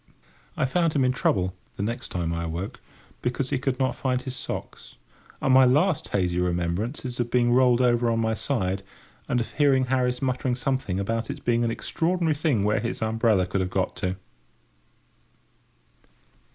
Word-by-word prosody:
I - - +2
found 165 +4 +1
him 135 -3 +2
in 125 - +3
trouble, 95 -7 +1 0.2
the - - -3
next 115 +3 -3
time 85 -2 -2
I 85 0 -2
awoke, 85 +5 -5 0.4
because 125 +2 -2
he - - +1
could 130 -1 -1
not 130 0 0
find 130 -2 0
his 130 0 -6
socks; 125 - -7 0.4
and 135 - +2
my 130 0 +8
last 150 +7 +3
hazy 90 -3 0
remembrance 90 - -1
is 125 -1 -5
of 120 -1 0
being 120 0 +3
rolled 125 -1 +4
over 120 -1 +3
on 115 - +1
my 110 0 +1
side, 100 -6 -1 0.5
and 125 - +2
of 115 - -3
hearing 135 -3 +3
Harris 125 -1 0
muttering 130 -1 0
something 125 -6 -1
about 115 +3 -2
its - - -4
being 120 0 +1
an 115 - +1
extraordinary 165 +7 0
thing 145 -9 +1
where 105 +1 +2
his 120 - -3
umbrella 110 -3 +2
could 95 +1 -1
have 90 - -1
got 95 0 -1
to. 95 -1 -2
120 Hz, 180 wpm, -25 LUFS, 100-130 Hz, 0.5 s, my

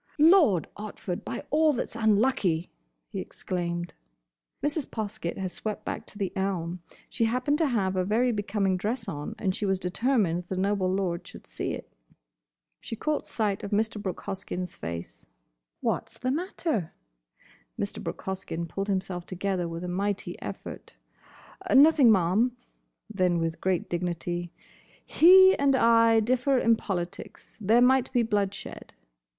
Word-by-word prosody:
"Lord 305 - +5
Otford, 205 -2 -5
by - - -5
all 310 0 +4
that's 240 - -4
unlucky!" 210 -6 +2 0.4
he - - -4
exclaimed. 175 -1 -4 0.7
Mrs. 290 0 -1
Poskett 210 -5 -4
had 190 -1 -3
swept 215 +2 -5
back - - -5
to - - -9
the 195 -3 -3
elm. 180 -3 -2 0.3
She 230 - 0
happened 255 +6 +1
to 320 - +3
have 195 -7 0
a 185 - +1
very 230 +6 +2
becoming 205 -3 0
dress 215 +7 -3
on, 145 -1 -5
and 190 -2 0
she 210 - -5
was 195 -1 +2
determined 185 -2 0
the 190 - -4
noble 195 -1 +1
lord 185 -3 -2
should - - -12
see - - -4
it. - - -8 0.9
She - - -6
caught 305 +6 -2
sight 205 -3 -1
of 200 - -5
Mr. 215 +1 0
Brooke 190 -4 -4
Hoskyn's 185 -2 -5
face. 85 0 -7 0.5
"What's - - -2
the 255 - -1
matter?" 310 - -2 0.9
Mr. - - -4
Brooke - - -5
Hoskyn 185 -3 -4
pulled 195 +4 -4
himself 190 -3 -2
together 185 -1 -2
with 165 +1 -6
a - - -3
mighty 200 +3 -2
effort. - - -8 0.8
"Nothing, 280 -3 +7
ma'am." 210 +6 +2 0.5
Then 185 -5 +1
with 165 0 -2
great 185 -2 0
dignity, 175 0 -3 0.5
"He 375 +3 +7
and 280 -1 +4
I 230 -2 +5
differ 255 +4 +2
in 230 -2 +4
politics. 185 -1 -6
There 220 +4 +4
might 260 0 +3
be 245 -2 +2
bloodshed." 205 -3 -3
200 Hz, 145 wpm, -27 LUFS, 180-240 Hz, 0.9 s, Nothing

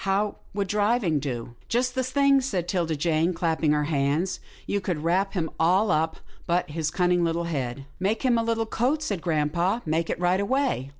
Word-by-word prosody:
How 200 +2 +1 0.2
would 200 -1 -1
driving 205 -5 +1
do?" 120 -4 -5
" - - -31
Just 250 +2 +1
the 260 - 0
thing," 275 +1 +3
said 190 -10 -2
'Tilda 170 -3 0
Jane, 165 +3 +1
clapping 165 -3 +1
her 150 0 +1
hands. 145 +4 0
" - - -23
You 200 - -1
could 175 -5 -3
wrap 190 +4 +1
him 165 -5 -2
all 185 +5 +3
up, 160 +1 +1 0.3
but 175 -2 0
his 155 0 -1
cun 180 +2 +1
ning 175 -1 +3
little 170 0 0
head." 135 -5 -3
" - - -29
Make 200 +7 0
him 250 -2 +3
a - - 0
little 225 0 0
coat," 260 +8 0
said 200 - -2
grampa, 170 +7 0
" - - -28
make 160 +1 0
it - - -2
right 180 +1 +2
away." 240 - 0
180 Hz, 220 wpm, -26 LUFS, 160-210 Hz, 0.3 s, thing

